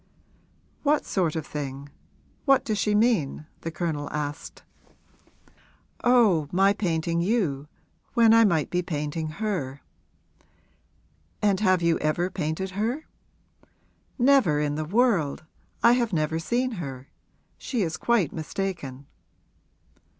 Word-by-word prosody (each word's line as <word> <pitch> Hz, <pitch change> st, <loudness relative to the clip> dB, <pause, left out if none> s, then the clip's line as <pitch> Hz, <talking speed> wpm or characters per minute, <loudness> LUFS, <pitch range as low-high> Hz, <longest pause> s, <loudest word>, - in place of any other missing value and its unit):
'What 295 Hz, 0 st, +2 dB
sort 175 Hz, -5 st, 0 dB
of 160 Hz, -2 st, -3 dB
thing 140 Hz, -1 st, -6 dB, 0.6 s
what 275 Hz, -2 st, +4 dB
does 215 Hz, -2 st, -1 dB
she 210 Hz, 0 st, +1 dB
mean?' 205 Hz, -, +1 dB
the 165 Hz, -, -5 dB
Colonel 155 Hz, -3 st, -3 dB
asked. 150 Hz, 0 st, -5 dB, 1.4 s
'Oh, 215 Hz, -, +4 dB
my 195 Hz, +2 st, +4 dB
painting 170 Hz, -4 st, -1 dB
you, 170 Hz, -, 0 dB, 0.5 s
when 230 Hz, -2 st, +6 dB
I 230 Hz, 0 st, +7 dB
might 170 Hz, -8 st, +1 dB
be 180 Hz, -, +1 dB
painting 155 Hz, -1 st, -3 dB
her.' 155 Hz, -7 st, -3 dB, 1.6 s
'And 200 Hz, -2 st, +2 dB
have 185 Hz, -4 st, +2 dB
you 170 Hz, -1 st, +2 dB
ever 170 Hz, +4 st, 0 dB
painted 180 Hz, +2 st, -3 dB
her?' 230 Hz, +10 st, -2 dB, 1.1 s
'Never 245 Hz, -, +4 dB
in 150 Hz, -1 st, 0 dB
the 155 Hz, +1 st, -3 dB
world; 180 Hz, -, +1 dB, 0.4 s
I 235 Hz, -, +7 dB
have 240 Hz, -4 st, +1 dB
never 160 Hz, 0 st, 0 dB
seen 245 Hz, +9 st, -1 dB
her. 135 Hz, -2 st, -7 dB, 0.5 s
She 240 Hz, -6 st, -1 dB
is 160 Hz, -2 st, -2 dB
quite 230 Hz, -10 st, +1 dB
mistaken.' 160 Hz, -5 st, -5 dB
175 Hz, 120 wpm, -26 LUFS, 150-215 Hz, 1.6 s, I